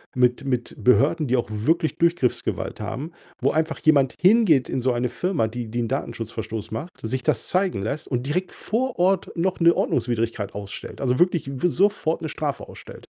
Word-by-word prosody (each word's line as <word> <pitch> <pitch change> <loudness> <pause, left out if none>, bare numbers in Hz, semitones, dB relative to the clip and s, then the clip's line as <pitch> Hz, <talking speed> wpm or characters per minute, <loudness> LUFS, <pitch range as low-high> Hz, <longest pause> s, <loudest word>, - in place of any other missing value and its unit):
mit 125 +1 +2
mit 125 -3 -2
Behörden, 140 +4 +3
die 125 +1 +2
auch 120 - -1
wirklich 155 +10 0
Durchgriffsgewalt 170 -7 0
haben, 135 +10 -5 0.3
wo - - +3
einfach 160 0 -1
jemand 140 -4 +4
hingeht 185 - +5
in 130 - -1
so 130 - +2
eine 120 +1 0
Firma, 160 -6 0
die 120 +1 -5
die 120 - -3
'n 115 - -1
Datenschutz 115 0 -4
Verstoß 110 -1 -5
macht, 125 +10 -4
sich 130 +4 -3
das 155 -6 0
zeigen 185 - +1
lässt 140 +8 -3
und 125 -1 -1
direkt 180 +5 -1
vor 245 -2 -2
Ort 185 0 +2
noch 185 +2 0
'ne 170 0 +7
Ordnungswidrigkeit 115 -4 -1
ausstellt, 100 +1 -7
also, 125 -1 +1
wirklich 175 -5 +2
w 180 - +3
sofort 175 -4 +1
'ne 160 - -3
Strafe 145 -4 -3
ausstellt. - - -12
135 Hz, 185 wpm, -24 LUFS, 120-170 Hz, 0.3 s, ne